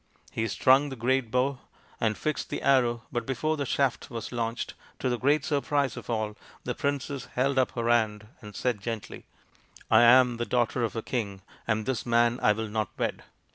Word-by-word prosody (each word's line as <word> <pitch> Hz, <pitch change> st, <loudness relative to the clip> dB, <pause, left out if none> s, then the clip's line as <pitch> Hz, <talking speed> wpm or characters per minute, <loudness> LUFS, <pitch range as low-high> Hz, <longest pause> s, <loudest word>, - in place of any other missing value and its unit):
He 115 Hz, -, -1 dB
strung 135 Hz, +6 st, +4 dB
the 135 Hz, -, -6 dB
great 130 Hz, 0 st, 0 dB
bow 125 Hz, +2 st, 0 dB, 0.4 s
and 110 Hz, -2 st, +1 dB
fixed 155 Hz, -1 st, -2 dB
the -, -, -4 dB
arrow, 120 Hz, -4 st, +3 dB
but 120 Hz, -2 st, -1 dB
before 135 Hz, +6 st, -1 dB
the 140 Hz, -3 st, -3 dB
shaft 135 Hz, -1 st, 0 dB
was 115 Hz, -2 st, -6 dB
launched, 115 Hz, -1 st, -3 dB, 0.2 s
to 130 Hz, -, -1 dB
the 120 Hz, -1 st, -1 dB
great 145 Hz, +2 st, +2 dB
surprise 145 Hz, -3 st, 0 dB
of -, -, -9 dB
all, 110 Hz, -2 st, -1 dB, 0.3 s
the -, -, -2 dB
princess 140 Hz, -1 st, -2 dB
held 135 Hz, +1 st, +2 dB
up 130 Hz, -, +1 dB
her 115 Hz, -1 st, -2 dB
hand, 110 Hz, -3 st, +2 dB, 0.2 s
and 105 Hz, -2 st, -11 dB
said 120 Hz, -5 st, -1 dB
gently, 115 Hz, 0 st, -6 dB, 0.3 s
" -, -, -24 dB
I -, -, +7 dB
am 125 Hz, 0 st, +6 dB
the 120 Hz, -, -2 dB
daughter 120 Hz, 0 st, +1 dB
of 115 Hz, -, -2 dB
a 115 Hz, -, -3 dB
king, 100 Hz, -7 st, -3 dB, 0.2 s
and 110 Hz, -1 st, 0 dB
this 130 Hz, -2 st, -1 dB
man 120 Hz, 0 st, +2 dB
I 105 Hz, -, +5 dB
will 110 Hz, +1 st, -2 dB
not 105 Hz, -1 st, -2 dB
wed." -, -, -2 dB
120 Hz, 200 wpm, -28 LUFS, 115-135 Hz, 0.4 s, I